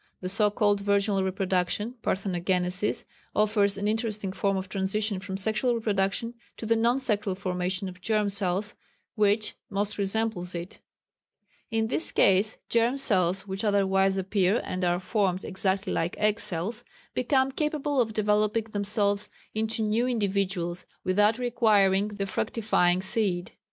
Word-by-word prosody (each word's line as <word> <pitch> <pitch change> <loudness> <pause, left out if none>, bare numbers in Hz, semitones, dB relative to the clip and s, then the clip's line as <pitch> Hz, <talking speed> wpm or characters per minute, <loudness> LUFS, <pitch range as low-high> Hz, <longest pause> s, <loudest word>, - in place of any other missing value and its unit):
The 185 - -4
so 210 +2 +3
called 205 -1 +2
virginal 200 -1 +1
reproduction 190 +3 -1
(Parthenogenesis) 180 0 -1 0.3
offers 205 -1 +2
an 205 +1 -1
interesting 215 -3 -1
form 195 0 0
of 190 0 -4
transition 195 +1 -1
from 190 0 -5
sexual 220 +5 +1
reproduction 210 +1 0 0.2
to - - -6
the 230 +1 +3
non 235 +3 +2
sexual 210 -7 0
formation 185 0 -2
of 180 0 -10
germ 210 +2 +1
cells 200 +1 0 0.4
which 210 0 +1 0.2
most 205 +1 -1
resembles 200 -3 -1
it.... 170 +2 -6 0.9
In 225 -1 0
this 255 +8 0
case 195 +3 +3
germ 235 +3 +2
cells 190 -7 +1
which 195 +1 -5
otherwise 195 -2 +2
appear 195 +2 +1
and 185 0 -3
are 175 0 +2
formed 190 -1 0
exactly 190 +1 -1
like 165 +1 -1
egg 215 +1 +1
cells, 210 +7 -4 0.3
become 265 +1 +2
capable 295 -1 0
of 220 -2 -1
developing 210 +1 +1
themselves 205 0 0 0.2
into 220 +1 -1
new 220 +3 +1
individuals 195 -6 -1 0.2
without 205 +4 +3
requiring 210 -5 +3
the 205 -1 -4
fructifying 185 -3 +1
seed. 190 -3 0
200 Hz, 140 wpm, -27 LUFS, 190-220 Hz, 0.9 s, so